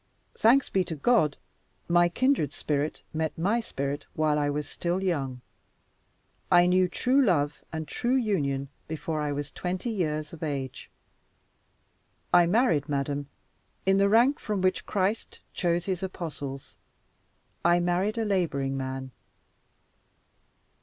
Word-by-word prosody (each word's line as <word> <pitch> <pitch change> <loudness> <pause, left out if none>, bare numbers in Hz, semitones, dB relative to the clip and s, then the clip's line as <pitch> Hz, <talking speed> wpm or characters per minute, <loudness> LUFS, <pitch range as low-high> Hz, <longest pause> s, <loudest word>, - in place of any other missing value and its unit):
Thanks 250 +5 +4
be 190 - +1
to 165 - -4
God, 155 - +2 0.5
my 175 0 +4
kindred 255 - +1
spirit 150 0 -2
met 160 0 -2
my 200 +8 +1
spirit 140 -8 -4
while 155 -1 +2
I 145 -1 +1
was 145 0 -2
still 175 +4 -2
young. 135 -9 -1 1.1
I 175 0 +7
knew 180 +1 +4
true 260 +9 +2
love 150 - +1
and 160 -1 -4
true 240 - 0
union 145 - 0 0.2
before 155 0 -3
I 150 -1 -1
was 145 0 -4
twenty 185 +6 -3
years 155 -7 -2
of 165 - -10
age. 140 -5 -4 1.4
I 175 -1 +7
married, 170 - +2
madam, 140 0 -2 0.6
in 195 0 +4
the 200 0 +4
rank 240 +7 +4
from 210 -2 -2
which 185 0 0
Christ 200 +3 -1
chose 175 -1 0
his 185 -2 -2
apostles 150 -7 -6 0.9
I 175 +1 +4
married 180 +5 0
a 225 - 0
laboring 150 -9 0
man. 130 0 -4
170 Hz, 135 wpm, -27 LUFS, 145-195 Hz, 1.4 s, I